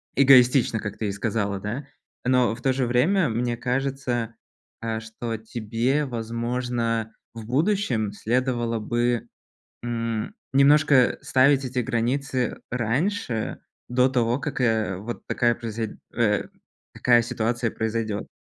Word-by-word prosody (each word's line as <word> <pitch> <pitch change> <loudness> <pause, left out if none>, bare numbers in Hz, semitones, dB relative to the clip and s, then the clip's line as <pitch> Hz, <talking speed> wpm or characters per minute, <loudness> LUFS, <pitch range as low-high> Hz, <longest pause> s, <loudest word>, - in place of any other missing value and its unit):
эгоистично, 130 -3 +5
как 105 -1 -5
ты 110 - -2
и - - -1
сказала, 100 -1 -2
да. 115 +8 -4 0.4
Но 125 -3 +3
в 120 - -13
то 130 0 +2
же 130 -1 0
время, 150 +8 +3
мне 120 +2 -1
кажется, 125 -2 -2 0.5
а, 115 -1 -2
что 115 +1 -5
тебе, 115 +6 -1
возможно, 115 -1 -2 0.2
в 115 -1 -7
будущем 130 - +1
следовало 120 0 0
бы, 120 +1 0 0.6
м, 115 -2 -2 0.2
немножко 140 -2 +5
ставить 135 +1 +3
эти 125 0 -2
границы 125 +1 -1
раньше, 125 - -1 0.3
до 125 +1 +4
того, 120 -1 +1
как, 130 - -3
э, 110 -6 +1
вот 110 +5 -7
такая 120 -1 +1
произой 115 -2 -5 0.2
э, 105 -3 +2 0.5
такая 120 -1 +4
ситуация 115 0 -1
произойдёт. 110 -2 -2
120 Hz, 125 wpm, -24 LUFS, 115-130 Hz, 0.6 s, эгоистично